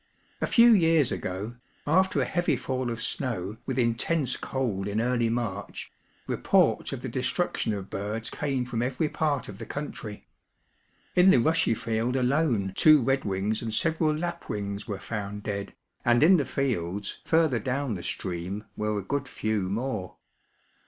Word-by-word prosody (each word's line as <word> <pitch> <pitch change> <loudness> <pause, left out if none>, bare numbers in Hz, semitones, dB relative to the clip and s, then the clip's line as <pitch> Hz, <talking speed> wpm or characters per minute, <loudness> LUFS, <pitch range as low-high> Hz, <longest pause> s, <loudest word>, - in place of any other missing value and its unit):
A - - +1
few 235 0 +7
years 165 - +4
ago, 100 +6 -4 0.3
after 185 +5 +3
a - - +1
heavy 175 -4 +1
fall 130 0 -2
of 115 0 -3
snow 110 -7 -3
with - - -2
intense 125 +4 +1
cold 110 -8 -2
in 105 +1 -1
early 120 -1 +1
March, 115 -4 -4 0.3
reports - - +2
of - - -5
the - - -3
destruction - - -1
of 100 -2 -5
birds 105 +3 -3
came 135 -4 -1
from 120 -2 -2
every 130 +5 0
part 145 -5 -1
of 100 -1 -9
the 115 - -6
country. 120 -7 -6 0.9
In 180 +1 +7
the 190 - +7
rushy 160 -1 +3
field 115 +3 -1
alone 125 -7 +1
two 155 -1 +7
redwings 110 -5 0
imd 110 -2 -4
several 160 +3 +1
lapwings 110 -12 -4
were 100 -3 -3
found 105 -1 -5
dead, 100 -1 -4 0.3
and 120 +3 +4
in 180 +4 +7
the 145 - 0
fields 100 -7 -2
further 160 -7 +3
down 135 0 -1
the 90 - -5
stream 90 +5 -4
were 105 0 -1
a 100 - -3
good 140 +6 -2
few 110 -5 -1
more. 110 -3 -3
120 Hz, 160 wpm, -27 LUFS, 105-145 Hz, 0.9 s, few